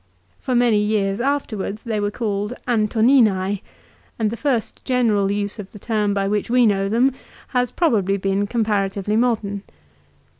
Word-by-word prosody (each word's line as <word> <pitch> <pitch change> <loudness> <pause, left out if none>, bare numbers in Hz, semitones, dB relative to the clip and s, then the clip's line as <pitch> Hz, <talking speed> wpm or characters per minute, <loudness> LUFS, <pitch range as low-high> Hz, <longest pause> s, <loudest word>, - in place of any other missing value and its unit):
For 255 - -2
many 240 -3 +4
years 210 -2 0
afterwards 220 -7 -2
they 220 -3 -2
were 205 0 0
called 210 0 -2
Antoni 230 +3 +3
anse, 190 0 -2 0.6
and 220 -2 0
the - - -3
first 250 -3 -2
general 220 -6 +1
use 205 +1 -3
of 200 -2 -9
the - - -9
term 210 -1 -1
by 195 0 0
which 210 +1 -1
we 245 0 +4
know 195 -2 +1
them 240 +5 +3 0.4
has 250 -1 0
probably 205 - +1
been 195 +1 0
comparatively 205 -2 -1
modern. 220 -4 0
210 Hz, 155 wpm, -21 LUFS, 200-235 Hz, 0.6 s, many